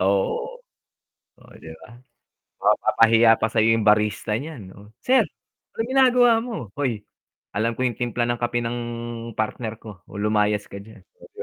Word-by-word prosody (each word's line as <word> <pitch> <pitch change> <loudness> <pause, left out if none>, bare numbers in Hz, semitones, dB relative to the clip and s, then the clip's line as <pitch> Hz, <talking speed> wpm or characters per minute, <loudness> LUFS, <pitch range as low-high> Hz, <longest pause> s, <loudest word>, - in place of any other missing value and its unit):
Oo, 100 - 0 0.8
oh, - - -20
di - - -11 0.2
ba. 110 - -15 0.7
Mapapahiya 115 0 +4
pa - - 0
sayo 110 -1 +3
yung 110 - -1
barista 105 0 +2
nyan 130 -12 -9
no 105 +2 -17
"Sir 260 +1 +4 0.5
anong 225 - -1
ginagawa 250 -2 +5
mo?" 220 - -6
"Hoy 120 -7 -2 0.5
alam 115 +3 -1
ko 130 - -1
yung 120 -3 -1
timpla 120 0 -1
ng 120 0 -2
kape 120 0 -1
ng 120 +1 -3 0.6
partner 110 +1 -3
ko 105 -5 -12
o - - -11
lumayas 105 0 +1
ka 100 - -8
dyan" 105 -2 -15 0.2
oh, - - -15
di - - -19
115 Hz, 165 wpm, -23 LUFS, 105-120 Hz, 0.8 s, ginagawa